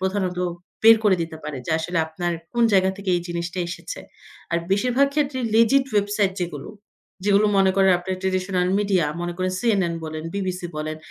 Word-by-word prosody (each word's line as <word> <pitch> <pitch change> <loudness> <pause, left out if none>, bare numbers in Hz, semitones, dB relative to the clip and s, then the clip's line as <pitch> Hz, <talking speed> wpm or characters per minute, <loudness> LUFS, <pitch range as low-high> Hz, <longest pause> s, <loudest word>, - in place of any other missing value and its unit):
প্রধানত 190 -1 -1 0.4
বের 225 0 +9
করে 200 -3 +5
দিতে 165 -1 -6
পারে। 150 -2 -5
যে - - -3
আসলে 165 +2 -2
আপনার 175 +2 -3 0.2
কোন 235 - +2
জায়গা 190 -1 +4
থেকে 200 -2 -3
এই 175 - -3
জিনিসটা 170 +1 -4
এসেছে। - - -7 0.5
আর 170 - +1
বেশিরভাগ 250 +7 +3
ক্ষেত্রেই 275 -4 0
Legit 245 +4 +5
website 205 -1 +1
যেগুলো, 170 -5 -4 0.6
যেগুলো, 205 +1 +4
মনে 190 -1 +5
করেন 190 -1 +5
আপনার 185 +1 -4
ট্র্যাডিশনাল 185 -1 0
মিডিয়া, 195 -6 +1
মনে 175 0 -3
করেন 185 0 -1
CNN 195 -8 +1
বলেন, 155 0 -6
BBC 185 -2 -2 0.2
বলেন, 155 0 -3
190 Hz, 175 wpm, -23 LUFS, 175-205 Hz, 0.6 s, বের